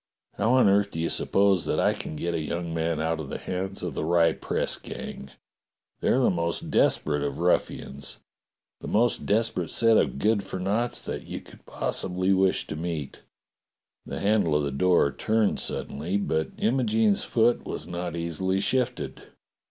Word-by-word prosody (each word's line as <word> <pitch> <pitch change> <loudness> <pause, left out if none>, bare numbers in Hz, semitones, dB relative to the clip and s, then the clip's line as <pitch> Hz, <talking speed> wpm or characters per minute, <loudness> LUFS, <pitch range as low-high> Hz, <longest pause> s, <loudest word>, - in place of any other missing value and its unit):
How 110 +5 +1
on 130 -4 +5
earth 100 +1 +3
do 80 - -6
you 85 - 0
suppose 100 -3 +2
that - - 0
I - - +3
can - - -6
get 85 +3 -2
a 80 - -1
young 85 +2 -3
man 80 -1 -1
out 80 +1 -1
of 75 -4 -6
the - - -4
hands 95 +1 -4
of 90 -5 -3
the - - -3
Rye 85 +1 +4
press - - -2
gang? 70 - -8 0.7
They're - - +2
the 130 - +3
most 85 -1 -2
desperate 75 -1 +2
of 70 -1 -2
ruffians. 70 -5 -1 0.6
The - - -8
most 115 +1 +1
desperate 105 -6 +1
set 115 -1 +4
of 65 -2 +1
good 105 +6 +2
for 95 -1 -6
noughts 105 +6 -1
that - - -5
you - - -5
could - - -17
possibly 95 +1 -1
wish 95 0 +2
to - - -6
meet." 80 -3 -4 0.9
The - - -4
handle 100 -6 +2
of 75 - +2
the 70 - -1
door 85 0 +3
turned 110 +4 +1
suddenly, 85 +8 -2
but 80 -6 -1
Imo 125 +4 +2
gene's 110 -3 +2
foot 120 +1 +2
was - - -5
not 85 -1 -4
easily 85 +3 -1
shifted. 125 +4 -1
90 Hz, 175 wpm, -26 LUFS, 80-105 Hz, 0.9 s, on